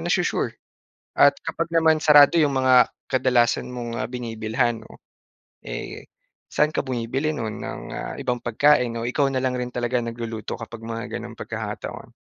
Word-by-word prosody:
na-su-sure? - - 0 0.6
At - - +7
kapag 165 0 -3
naman 160 -1 +4
sarado 150 +1 +7
'yong 150 -3 +3
mga 130 -1 +4 0.4
kadalasan 125 -2 +2
mong 120 -2 -5
ah, - - -1
binibilhan 115 -1 -2
'no, - - -16 0.6
eh - - -7 0.4
saan 150 0 +2
ka - - 0
bumibili 130 +3 -2
nun 110 -3 -4
ng - - -6
ah, - - -5
ibang 125 -3 -2
pagkain, 125 0 +3
o 115 - -3
ikaw 135 +3 +1
na 130 - -1
lang 130 -1 0
rin 125 0 -3
talaga 120 0 0
nagluluto 115 -1 -5
kapag 115 -1 -8
mga 115 +1 -5 0.2
ganong 115 -1 -9
pagkakataon? 110 -2 -6
120 Hz, 155 wpm, -23 LUFS, 115-135 Hz, 0.6 s, At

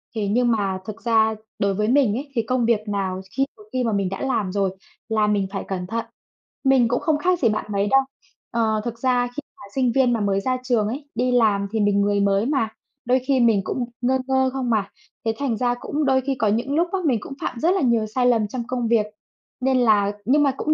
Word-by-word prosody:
Thế 210 -2 -1
nhưng 240 +4 +2
mà 195 -4 0
thực 215 +2 -8
ra 220 -1 +3 0.2
đối 200 0 +1
với 210 +2 0
mình 250 -4 +3
ấy, 280 +1 -7
thì 230 - +2
công 245 +1 0
việc 230 -2 +3
nào 190 -2 -2
khi 270 - +1
một 210 - -15
khi 255 -1 0
mà 230 - 0
mình 195 -2 0
đã 195 - -5
làm 230 -8 -1
rồi 195 -1 0 0.4
là 215 -1 +2
mình 205 -2 +1
phải 195 - -4
cẩn 180 -2 -4
thận. 230 +2 -3 0.6
Mình 265 -4 +4
cũng 245 - 0
không 315 -2 +1
khác 360 +3 +1
gì 235 - +3
bạn 215 - -2
mấy 200 +1 +1
đâu. 270 - +6 0.5
Ờ, 220 -2 +1
thực 235 -1 -5
ra 245 -1 +2
khi 245 +4 -7 0.2
mà - - -14
sinh 255 -3 +2
viên 260 -2 +4
mà 230 - 0
mới 200 -1 +1
ra 255 +3 0
trường 235 -5 +1
ấy, 280 +5 -6
đi 250 +2 +1
làm 210 -5 +3
thì 220 - -1
mình 205 -1 +2
người 205 0 +1
mới 200 +1 +2
mà, 270 -5 0 0.4
đôi 250 +2 +3
khi 275 -2 +3
mình 225 -4 +4
cũng 245 +5 -2 0.2
ngơ 255 +2 +2
ngơ 265 0 +2
không 260 -2 -2
mà. 215 -4 +1 0.4
Thế 225 - +1
thành 265 -6 -1
ra 245 +1 +1
cũng 295 +4 -2
đôi 265 -1 +3
khi 270 +1 -2
có 225 -4 0
những 235 +7 0
lúc 340 +2 +2
á 385 - +1
mình 255 -7 +2
cũng - - -8
phạm 235 - -3
rất 330 +6 +3
là 385 - 0
nhiều 235 -4 +2
sai 245 +4 0
lầm 225 -4 +3
trong 240 +3 -4
công 245 -2 -2
việc, 225 -2 +3 0.6
nên 260 0 +2
là 210 -4 +3
nhưng 290 +6 +4
mà 275 - +3
cũng 310 - +1
235 Hz, 250 wpm, -22 LUFS, 210-260 Hz, 0.6 s, đâu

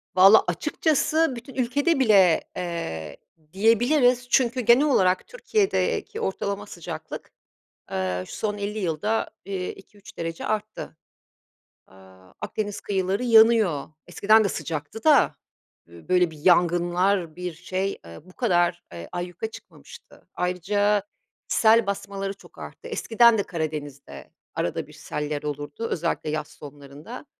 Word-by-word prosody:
Valla, 195 +4 +8
açıkçası 305 - +1
bütün 240 +3 -10
ülkede 275 +5 +1
bile, 195 -9 +5 0.2
eee, 80 - -5 0.4
diyebiliriz 245 +4 +3
çünkü 255 -1 +2
genel 245 +5 +5
olarak 185 -10 +2
Türkiye'deki 445 -2 -1
ortalama 200 +1 -3
sıcaklık, 175 -5 -8 0.6
eee, 90 -1 -2
şu - - -10
son 210 -1 -2
50 205 +1 -4
yılda, 195 +5 -1 0.2
eee, 190 -2 -4
2-3 200 +1 -16
derece 165 0 -4
arttı. 215 -6 -4 0.9
Aaa, 95 -1 -19
Akdeniz 205 -2 -4
kıyıları 195 +3 -1
yanıyor, 220 - +5 0.2
eskiden 215 +2 +4
de - - +2
sıcaktı 155 +4 -5
da 305 -3 +5 0.5
böyle 165 - 0
bir 155 - -13
yangınlar, 175 0 +2
bir 180 -1 -4
şey, 185 +3 -3
eee, 85 0 -11
bu 185 - -17
kadar, 175 -6 +1
eee, 85 -1 -8
ayyuka 175 +5 -5
çıkmamıştı. 475 - -15
Ayrıca 200 +3 +1 0.5
sel 225 0 +4
basmaları 200 0 -3
çok 200 - -19
arttı. - - -10
Eskiden 235 -1 +4
de - - +2
Karadeniz'de 155 -5 -6 0.2
arada - - -2
bir - - -16
seller 150 0 -4
olurdu, 145 +8 -5
özellikle 165 -2 -2
yaz 155 -1 -3
sonlarında. 145 - -11
190 Hz, 125 wpm, -24 LUFS, 160-225 Hz, 0.9 s, Valla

